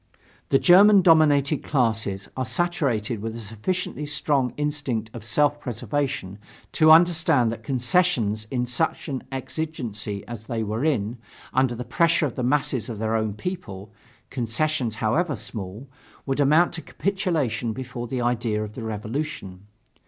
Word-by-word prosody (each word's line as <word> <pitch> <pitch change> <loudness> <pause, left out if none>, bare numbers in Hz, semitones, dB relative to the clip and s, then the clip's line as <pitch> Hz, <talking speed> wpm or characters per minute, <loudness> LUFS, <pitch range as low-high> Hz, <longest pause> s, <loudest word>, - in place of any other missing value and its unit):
The 135 - +5
German 195 +5 +7
dominating 150 -3 +4
classes 110 -7 0
are 130 - -1
saturated 130 - -1
with 115 +1 -4
a - - -6
sufficiently 145 - -3
strong 145 -3 +1
instinct 145 -7 -2
of 120 - -8
self 145 +6 +1
preservation 120 -4 -3 0.3
to 155 -1 +4
understand 160 -7 +5
that 115 - -6
concessions 125 - +1
in 125 -2 -1
such 125 +9 -1
an 135 -2 -3
exigency 125 -8 -4
as 110 -1 -8
they 115 -2 -2
were 110 +4 -2
in, 120 -6 0 0.3
under 130 -2 +2
the 125 +1 -6
pressure 165 +7 +2
of 135 - -3
the - - -4
masses 130 -2 0
of 115 - -5
their 110 +1 -1
own 110 -2 -1
people 105 - -6 0.4
concessions 125 0 -1
however 145 +9 0
small 105 +2 -7 0.4
would 135 0 -2
amount 155 +6 +4
to 170 - -4
capitulation 155 - -1
before 125 0 -6
the 125 +1 -3
idea 120 -3 0
of 105 0 -7
the 120 - -7
revolution. 110 -3 -5
125 Hz, 145 wpm, -24 LUFS, 110-150 Hz, 0.4 s, German